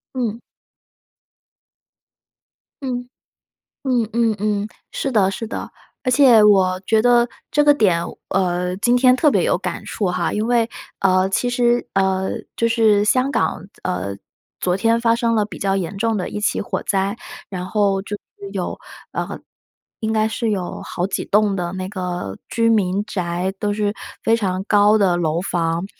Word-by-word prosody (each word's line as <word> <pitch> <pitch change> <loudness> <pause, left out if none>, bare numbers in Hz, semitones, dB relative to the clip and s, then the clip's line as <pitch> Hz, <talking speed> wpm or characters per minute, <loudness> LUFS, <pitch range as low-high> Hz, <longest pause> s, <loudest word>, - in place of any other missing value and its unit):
嗯。 235 -3 -2 2.4
嗯， 245 -2 -3 0.8
嗯 245 -5 +1
嗯 230 -1 +2
嗯， 210 0 -1 0.2
是 270 - -3
的， 195 -4 +3
是 225 +4 -5
的， - - -6 0.3
而 255 - 0
且 250 -4 +6
我 190 -3 +4
觉 220 -1 +3
得 240 0 +4 0.2
这 295 0 +3
个 290 0 +6
点， 185 -10 +2 0.3
呃， 180 -1 0
今 240 +4 +3
天 250 0 +5
特 295 +3 +3
别 - - +2
有 - - +2
感 - - -5
触 205 - -2
哈， 180 -1 -1
因 215 +1 -1
为， 235 -1 +2 0.3
呃， 185 0 +3
其 245 +5 0
实， 245 0 +2
呃， 190 -1 +1 0.3
就 230 - +1
是 220 -3 +3
香 255 +5 +2
港， 190 - -1 0.2
呃， 95 +2 -3 0.4
昨 180 0 +1
天 225 +3 +2
发 230 -1 +3
生 230 -1 +1
了 215 -2 +2
比 215 - -9
较 195 -1 0
严 190 0 -3
重 225 +1 +1
的 185 - -2
一 210 - -4
起 210 - 0
火 - - -3
灾， 195 +1 0 0.3
然 180 -2 -4
后 200 -1 +1
就 205 +1 -5
是 200 0 -13
有， 190 -3 -3 0.3
呃， - - -4 0.6
应 220 0 -1
该 215 0 +2
是 225 +1 -1
有 185 -4 -3
好 180 +1 -3
几 195 - -3
栋 210 -1 +2
的 175 -2 -3
那 185 0 -4
个 180 - -4
居 230 0 +1
民 200 -2 +2
宅， 180 -1 -2
都 205 -1 0
是 205 0 -1 0.3
非 225 +1 +4
常 190 -3 -2
高 210 +1 +4
的 190 -4 +3
楼 165 -1 0
房， 170 -1 -1
205 Hz, 180 characters per minute, -20 LUFS, 185-230 Hz, 2.4 s, 且